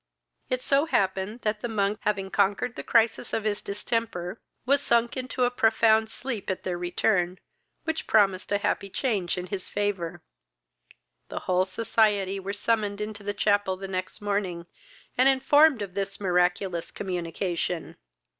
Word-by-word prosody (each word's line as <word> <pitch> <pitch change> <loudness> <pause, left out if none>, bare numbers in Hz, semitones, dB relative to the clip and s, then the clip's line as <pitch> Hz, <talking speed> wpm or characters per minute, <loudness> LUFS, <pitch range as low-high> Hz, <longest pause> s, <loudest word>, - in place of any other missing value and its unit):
It 255 0 0
so 280 +3 +3
happened, 195 - 0
that 210 0 -1
the - - -2
monk, 210 -2 0
having 195 -2 -1
conquered 205 +5 +1
the - - -5
crisis 230 -1 +2
of 220 - 0
his 210 -1 -1
distemper, 200 -2 -3 0.2
was 280 +2 +4
sunk 235 0 +2
into 255 -1 -2
a 245 - +3
profound 220 -1 +3
sleep 235 -3 -5
at 190 - -2
their 180 - -2
return, 180 +1 0 0.5
which 320 -1 -3
promised 195 -3 +3
a 205 - +3
happy 200 0 -1
change 195 -6 -1
in 180 - -3
his 185 0 -5
favour. 180 -5 -2 1.1
The - - -5
whole 185 0 +2
society 200 -1 +1
were 195 +1 -4
summoned 205 0 0
into 210 0 -5
the 205 0 -3
chapel 205 -2 +2
the 195 +1 -6
next 185 +1 -4
morning, 200 -4 -2 0.5
and 260 +1 +7
informed 270 -1 +5
of 190 -3 -7
this 195 0 -3
miraculous 180 -1 +1
communication. 175 -2 -3
205 Hz, 155 wpm, -27 LUFS, 185-225 Hz, 1.1 s, and